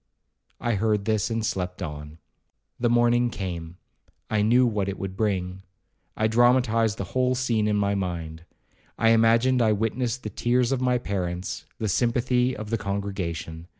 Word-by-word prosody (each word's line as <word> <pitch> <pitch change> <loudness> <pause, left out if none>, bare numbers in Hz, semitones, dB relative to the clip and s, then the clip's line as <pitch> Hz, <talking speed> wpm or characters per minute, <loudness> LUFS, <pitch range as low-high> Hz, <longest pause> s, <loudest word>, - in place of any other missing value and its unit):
I 120 - 0
heard 105 -1 0
this, 110 0 +1
and 115 -1 -1
slept 90 -2 -3
on. 75 -1 -7 0.6
The 120 - +2
morning 120 0 +3
came—I 90 +3 -6
knew 120 +4 +4
what 105 -4 0
it 100 - -4
would 95 -1 -5
bring—I 95 0 -4
dramatized 115 -1 +3
the - - -3
whole 130 0 +2
scene 115 -4 0
in 105 - +1
my 100 -1 +1
own 100 - 0
mind. 85 -3 -5 0.5
I 115 - +3
imagined 115 +3 +4
I 110 -2 +4
witnessed 115 +3 -2
the 110 - -5
tears 120 +4 +1
of 135 -2 0
my 125 -1 +2
parents, 90 -5 -4
the 110 - -2
sympathy 125 +4 +1
of 110 0 -7
the 115 - 0
congregation. 95 -5 -4
110 Hz, 155 wpm, -25 LUFS, 95-120 Hz, 0.6 s, knew